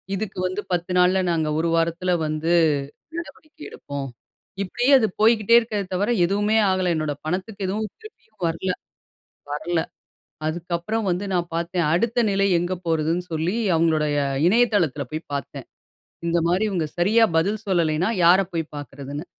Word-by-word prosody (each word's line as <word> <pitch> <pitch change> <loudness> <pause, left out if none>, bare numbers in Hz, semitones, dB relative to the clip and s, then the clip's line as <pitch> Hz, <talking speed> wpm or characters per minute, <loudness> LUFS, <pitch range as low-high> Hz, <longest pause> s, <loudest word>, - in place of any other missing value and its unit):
இதுக்கு 200 -1 -5
வந்து 185 +3 -3
10 175 0 -1
நாள்ல 180 +1 +4
நாங்க 160 -2 0
ஒரு 170 - +1
வாரத்துல 170 +2 0
வந்து 155 +2 -1 0.7
நடவடிக்கை 315 -2 -9
எடுப்போம். 140 -1 -6 0.5
இப்பிடியே 245 +8 +1
அது 220 - +2
போய்க்கிட்டே 225 0 +4
இருக்கே 225 -3 -2
தவிர, 200 +4 0 0.2
எதுவுமே 205 +4 +1
ஆகல. 185 -1 +1
என்னோட 155 -2 -1
பணத்துக்கு 190 +4 -3
எதுவும் 210 +3 -2
திருப்பியும் 220 - -16
வரல, 165 +3 -1 0.8
வரல. 165 +3 -1 0.7
அதுக்கப்புறம் 175 +6 -2
வந்து 180 +3 -1
நான் 175 -1 0
பாத்தேன் 170 0 -1
அடுத்த 235 +6 +1
நிலை 195 0 +2
எங்கு 175 +2 -2
போறதுன்னு 165 +2 0
சொல்லி, 165 +7 -1 0.2
அவங்களுடைய 155 -2 +2 0.3
இணையதளத்தில 200 - +2
போய் 155 +1 -5
பாத்தேன். 140 - -6 0.6
இந்தமாரி 170 +3 +1
இவுங்க 170 -5 -1
சரியா 215 +6 +4
பதில் 200 +6 +1
சொல்லல்லயின்னா, 170 0 +1
யார 180 +3 +7
போய் 165 -2 -3
பாக்குறதுன்னு. 145 +1 -7
180 Hz, 135 wpm, -23 LUFS, 165-205 Hz, 0.8 s, யார